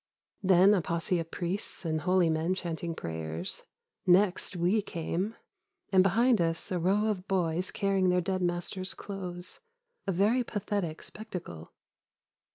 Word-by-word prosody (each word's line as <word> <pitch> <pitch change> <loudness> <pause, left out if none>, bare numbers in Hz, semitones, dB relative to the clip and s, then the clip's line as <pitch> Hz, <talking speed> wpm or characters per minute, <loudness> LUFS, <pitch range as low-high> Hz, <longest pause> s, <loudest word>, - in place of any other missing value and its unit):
Then 190 +1 +6
a 195 - +3
posse 170 +2 0
of 165 0 -5
priests 180 +2 -4
and 160 -1 0
holy 180 +2 +3
men 160 +3 +1
chanting 170 -2 -4
prayers. 80 - -4 0.4
Next 185 +1 +3
we 180 +5 +2
came, 185 +3 -3 0.6
and 190 -1 +6
behind 225 +3 +4
us 165 +1 -1
a 180 - 0
row 195 +5 +2
of 200 -3 -2
boys 180 -1 0
carrying 195 -2 +1
their 180 0 +3
dead 185 +1 -1
master's 175 +2 -1
clothes, 180 -3 -6 0.5
a - - +2
very 210 +8 +3
pathetic 200 -7 -3
spectacle. 175 - -8
180 Hz, 140 wpm, -30 LUFS, 170-195 Hz, 0.6 s, Then